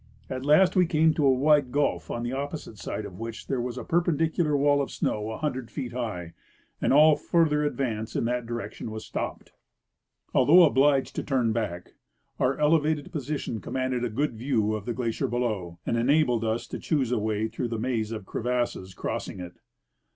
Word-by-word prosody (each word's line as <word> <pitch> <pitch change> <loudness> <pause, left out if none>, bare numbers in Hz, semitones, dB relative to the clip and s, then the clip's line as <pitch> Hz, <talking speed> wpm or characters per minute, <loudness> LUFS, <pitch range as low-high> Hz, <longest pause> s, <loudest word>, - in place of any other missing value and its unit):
At 130 0 -3
last 155 +6 +5
we 180 -2 +4
came 160 -1 +3
to 150 - +1
a - - +6
wide 140 0 +3
gulf 145 +1 0
on 120 - -3
the 120 +1 -3
opposite 140 - -5
side 105 - -4
of 95 -2 -9
which 115 0 -6
there 130 -3 -1
was 125 0 -4
a - - -4
perpendicular 165 -2 +1
wall 145 0 +3
of 140 - -3
snow 105 0 -2
a 110 - -5
hundred 130 -6 -3
feet 130 -5 -5
high, 100 -9 -4 0.5
and - - +2
all 150 +2 +7
further 150 -3 +2
advance 120 -7 -2
in - - 0
that 120 0 -1
direction 115 -2 -5
was 110 0 -7
stopped. - - -5 0.8
Although 175 +4 +7
obliged 140 -2 +3
to - - -1
turn 125 -5 +1
back, 100 -6 -4 0.5
our 130 +2 +1
elevated 150 -1 +2
position 145 -7 -3
commanded 130 -1 -2
a 120 - 0
good 135 +5 -1
view 110 -2 0
of 105 -2 -4
the 120 - -2
glacier 115 -3 -1
below 110 -8 -2
and 115 - 0
enabled 125 -1 +2
us 110 +1 -1
to - - -5
choose 135 -7 0
a 125 - +1
way 110 0 -1
through 115 +2 -3
the 115 -1 -3
maze 110 -2 -1
of 110 -3 -5
crevasses 120 -6 -2
crossing - - -4
it. 90 -1 -7
125 Hz, 190 wpm, -27 LUFS, 110-145 Hz, 0.8 s, all